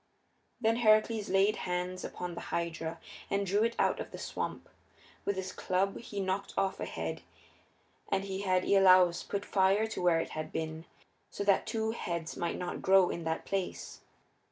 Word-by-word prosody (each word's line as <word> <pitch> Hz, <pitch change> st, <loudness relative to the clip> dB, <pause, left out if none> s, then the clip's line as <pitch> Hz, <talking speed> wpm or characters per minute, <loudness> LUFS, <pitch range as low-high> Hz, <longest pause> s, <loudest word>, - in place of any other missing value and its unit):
Then 225 Hz, -1 st, +2 dB
Heracles 215 Hz, -1 st, +3 dB
laid 195 Hz, +2 st, +3 dB
hands 180 Hz, 0 st, -3 dB
upon 180 Hz, -1 st, -5 dB
the -, -, -6 dB
Hydra 165 Hz, -1 st, -3 dB, 0.3 s
and 200 Hz, 0 st, 0 dB
drew 200 Hz, +2 st, +2 dB
it 230 Hz, 0 st, 0 dB
out -, -, +2 dB
of -, -, -5 dB
the -, -, -8 dB
swamp. -, -, -4 dB, 0.6 s
With 200 Hz, -, 0 dB
his 190 Hz, 0 st, -4 dB
club 190 Hz, +2 st, 0 dB
he 205 Hz, -3 st, -6 dB
knocked 195 Hz, +1 st, -2 dB
off 195 Hz, -, 0 dB
a -, -, -2 dB
head -, -, -4 dB, 0.9 s
and 195 Hz, 0 st, +1 dB
he 195 Hz, 0 st, -4 dB
had 185 Hz, -2 st, +2 dB
Iolaus 185 Hz, -3 st, +6 dB
put 200 Hz, 0 st, -4 dB
fire 195 Hz, +2 st, +3 dB
to 220 Hz, -, -5 dB
where 175 Hz, -2 st, +4 dB
it -, -, -3 dB
had 155 Hz, 0 st, -5 dB
been, 160 Hz, 0 st, -4 dB, 0.4 s
so 200 Hz, -, -4 dB
that 200 Hz, -1 st, +3 dB
two 220 Hz, -1 st, -1 dB
heads 170 Hz, -7 st, -4 dB
might 170 Hz, -, -2 dB
not 180 Hz, -, -4 dB
grow 190 Hz, -1 st, +5 dB
in 170 Hz, -, -5 dB
that 160 Hz, 0 st, -2 dB
place. 195 Hz, -2 st, -3 dB
190 Hz, 180 wpm, -31 LUFS, 175-200 Hz, 0.9 s, Iolaus